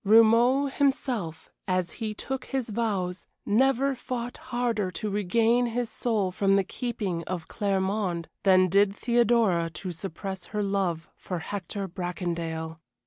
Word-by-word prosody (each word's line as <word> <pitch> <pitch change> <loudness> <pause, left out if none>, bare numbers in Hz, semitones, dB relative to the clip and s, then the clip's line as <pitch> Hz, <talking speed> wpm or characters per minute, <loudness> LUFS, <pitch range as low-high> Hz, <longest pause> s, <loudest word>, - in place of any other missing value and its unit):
Romauld 230 +6 +5
himself, 250 - -1 0.2
as 185 -2 0
he 215 -1 -2
took 265 +4 -4
his 265 -4 -2
vows, 200 -5 -2 0.2
never 270 +5 +3
fought 245 -1 -5
harder 235 -5 0
to 200 +4 -4
regain 225 +5 +2
his 235 0 -2
soul 220 -5 0
from 195 +1 +2
the 195 - +3
keeping 200 -5 -3
of 175 -2 -4
Claremonde 190 -4 -1
than 185 -1 +5
did 200 +2 +3
Theodora 230 -8 +3
to 180 +3 -6
suppress 190 +2 -6
her 210 -1 -2
love 190 -5 -1
for 180 - -5
Hector 195 +3 -4
Bracondale. 170 -3 -4
200 Hz, 135 wpm, -27 LUFS, 180-235 Hz, 0.2 s, Romauld